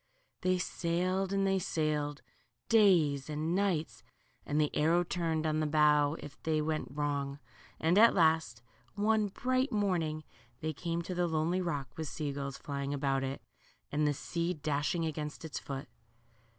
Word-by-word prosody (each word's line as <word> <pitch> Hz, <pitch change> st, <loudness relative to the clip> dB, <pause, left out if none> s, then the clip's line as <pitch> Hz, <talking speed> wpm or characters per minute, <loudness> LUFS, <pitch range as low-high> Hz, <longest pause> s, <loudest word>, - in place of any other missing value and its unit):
They 185 Hz, 0 st, +2 dB
sailed 185 Hz, +2 st, -1 dB
and 195 Hz, 0 st, +1 dB
they 195 Hz, 0 st, +2 dB
sailed, 150 Hz, -3 st, -1 dB, 0.5 s
days 170 Hz, -, +4 dB
and 155 Hz, +2 st, -1 dB
nights, 185 Hz, -5 st, 0 dB, 0.5 s
and 145 Hz, +1 st, +1 dB
the 150 Hz, -1 st, +1 dB
arrow 165 Hz, +3 st, +3 dB
turned 165 Hz, -2 st, -1 dB
on 155 Hz, 0 st, +1 dB
the 155 Hz, -, +1 dB
bow 150 Hz, -1 st, +4 dB
if 145 Hz, -1 st, -11 dB
they 155 Hz, -1 st, +1 dB
went, 155 Hz, 0 st, -1 dB
wrong, 140 Hz, -1 st, -2 dB, 0.4 s
and 170 Hz, +5 st, +3 dB
at 230 Hz, +1 st, +7 dB
last, 160 Hz, -9 st, +2 dB, 0.3 s
one 215 Hz, 0 st, +2 dB
bright 255 Hz, +6 st, 0 dB
morning, 175 Hz, -7 st, 0 dB, 0.4 s
they 155 Hz, 0 st, -2 dB
came 170 Hz, +3 st, -3 dB
to 180 Hz, -, -4 dB
the 175 Hz, 0 st, +1 dB
lonely 165 Hz, +3 st, 0 dB
rock, 145 Hz, -7 st, -3 dB
with 160 Hz, -1 st, -3 dB
sea 145 Hz, 0 st, -3 dB
gulls 140 Hz, -1 st, -4 dB
flying 140 Hz, 0 st, -3 dB
about 135 Hz, -1 st, 0 dB
it, 135 Hz, +1 st, -4 dB, 0.5 s
and 150 Hz, +1 st, +2 dB
the 145 Hz, -, +2 dB
sea 170 Hz, +5 st, -2 dB
dashing 150 Hz, +3 st, -1 dB
against 155 Hz, 0 st, -4 dB
its 155 Hz, -, -4 dB
foot. 135 Hz, -1 st, -6 dB
155 Hz, 160 wpm, -32 LUFS, 145-180 Hz, 0.5 s, at